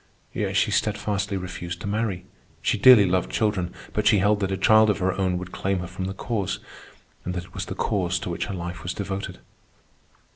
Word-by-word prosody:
Yet - - -1
she - - +2
steadfastly 100 -1 0
refused 90 -1 -6
to - - -5
marry. 100 -3 -2 0.4
She - - +2
dearly 115 -1 +8
loved 90 -1 +1
children, 100 -5 0 0.2
but 105 - +1
she 105 - +6
held 100 +2 +3
that 95 -1 -1
a 95 - -1
child 110 +2 +5
of 105 - +2
her 95 -1 0
own 95 -2 0
would 90 0 -7
claim 95 +1 -1
her 90 - -3
from 90 +1 -5
the 95 +1 -4
Cause, 100 -2 -2 0.7
and 90 - -4
that 90 - -3
it - - -19
was - - -4
the - - -5
Cause 90 -3 0
to - - -4
which 85 - -2
her 100 - -4
life 85 -1 -5
was 90 +2 -4
devoted. 100 -1 -4
95 Hz, 215 wpm, -25 LUFS, 90-105 Hz, 0.7 s, dearly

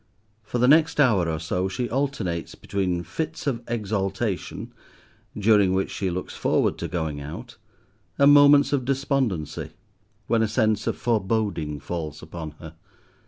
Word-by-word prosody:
For 110 +3 -4
the 125 +1 +3
next 155 +2 +4
hour 105 - +4
or 80 - -1
so 90 +4 -1
she 120 +6 -2
alternates 115 -10 -2
between 90 -3 -2
fits 155 - -5
of 125 -5 -1
exaltation, 100 -2 -3 0.6
during 105 -3 +4
which 95 0 0
she 95 - -2
looks 90 +1 -4
forward - - +1
to - - -3
going 80 -4 -3
out, 75 +3 -8 0.6
and 140 +1 +7
moments 145 0 +6
of 135 -3 +1
despondency, 130 - -1 0.5
when 115 -1 +2
a 110 - +2
sense 110 -1 +1
of - - -1
foreboding 100 -9 -1
falls 75 0 -5
upon 80 -1 -7
her. 80 -2 -10
100 Hz, 145 wpm, -24 LUFS, 85-125 Hz, 0.6 s, and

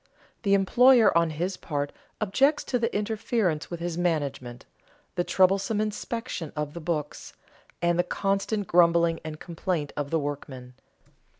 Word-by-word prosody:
The 200 -3 +3
employer 235 +3 +5
on 170 -1 +4
his 175 +5 -3
part 145 -2 -3 0.3
objects 265 +9 +2
to 250 - -1
the 230 0 0
interference 210 -6 -1
with 175 - -5
his 170 0 -3
management, 140 -8 -2 0.5
the 175 - 0
troublesome 195 +4 +2
inspection 215 - -3
of 150 -1 -3
the 170 - -7
books, 155 -3 -4 0.5
and 170 0 +2
the - - +4
constant 195 +3 -1
grumbling 170 -1 +4
and 155 -1 -7
complaint 170 -3 -3
of 145 -1 -3
the 165 - +1
workmen. 140 -4 -5
175 Hz, 140 wpm, -26 LUFS, 155-200 Hz, 0.5 s, employer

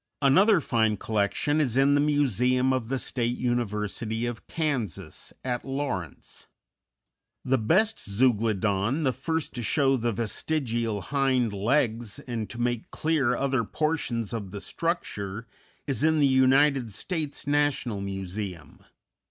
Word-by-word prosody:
Another 190 +9 +5
fine 110 -4 +1
collection 110 +10 0
is 130 -4 0
in 135 +1 +5
the 145 - +4
Museum 130 -3 +2
of 125 -3 -2
the 135 - 0
State 120 -1 -1
University 115 -1 -2
of 120 -1 -5
Kansas, 135 - -3
at 125 -2 -2
Lawrence._ 135 - -5 1.0
_The 125 -4 +1
best 215 +6 +3
Zeuglodon, 110 - +1
the 130 -3 +2
first 160 +4 -2
to 120 - -4
show 135 +3 +2
the 120 0 0
vestigial 115 -1 -1
hind 130 0 +1
legs 115 0 0
and 115 -4 -5
to 120 - -7
make 120 -1 -1
clear 155 -6 +1
other 135 -3 +1
portions 120 -5 -1
of 105 -4 -4
the 100 - -6
structure, 115 - -3 0.4
is 135 -2 -1
in 160 0 +3
the 145 - +5
United 130 -1 +4
States 155 - -3
National 145 -7 0
Museum. 95 -2 -6
125 Hz, 130 wpm, -27 LUFS, 110-145 Hz, 1.0 s, Another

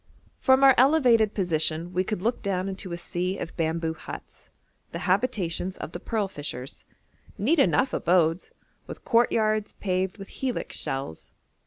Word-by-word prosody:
From 265 0 +4
our 270 -1 +9
elevated 250 -6 +4
position 165 -2 0
we 185 +1 +1
could 200 -1 -4
look 235 +2 0
down 190 -2 -1
into 190 -1 -5
a 170 - -3
sea 180 +2 -2
of - - -6
bamboo 160 0 -1
huts, - - -10 0.4
the - - -4
habitations 185 -6 0
of - - -6
the 175 - -6
pearl 215 +1 -1
fishers: 145 -7 -6 0.5
neat 285 - +2
enough 265 -1 +3
abodes, 170 0 +2 0.4
with - - -9
courtyards 215 -2 +2
paved 185 0 -2
with 195 -1 -10
helix 260 -2 -3
shells. 135 -12 -4
190 Hz, 150 wpm, -26 LUFS, 170-230 Hz, 0.5 s, our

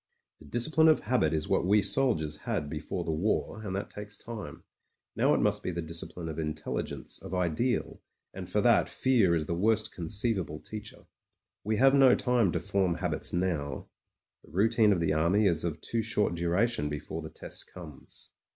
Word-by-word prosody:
The - - -15
discipline 155 +7 +3
of 155 - +5
habit 110 -9 +1
is 80 -1 -1
what - - +1
we 100 +4 +4
soldiers 100 - +1
had 75 0 -3
be 75 - -3
fore 90 +3 -4
the 80 - -2
war, 100 +6 -1
and 95 -3 -4
that 100 - -4
takes 105 0 -7
time. 115 -3 -8 0.5
Now - - +3
it - - +1
must - - +1
be - - -3
the 85 -1 -3
discipline 85 +1 -5
of 80 0 -5
intelligence, 75 -3 -4
of 95 - -6
ideal. 90 +8 -1 0.3
And - - -7
for - - +1
that - - +4
fear 115 -10 +3
is 80 -2 0
the 85 - -2
worst 110 +5 +2
conceivable 95 -3 -1
teacher. 105 +4 -9 0.6
We 110 +1 0
have 135 +3 +5
no 135 -2 +6
time 120 -7 +2
to 85 - 0
form 90 +1 0
habits 85 -3 -1
now; 80 -7 -2 0.5
the - - -19
routine 110 +3 +3
of 90 -4 +1
the 80 -2 +1
army 85 +7 +2
is 85 -5 +2
of 85 -2 -3
too 115 - -1
short 105 -4 +1
duration 85 +1 0
before 75 +2 -5
the 80 - -7
test - - -7
comes. 80 -6 -12
90 Hz, 190 wpm, -29 LUFS, 80-110 Hz, 0.6 s, no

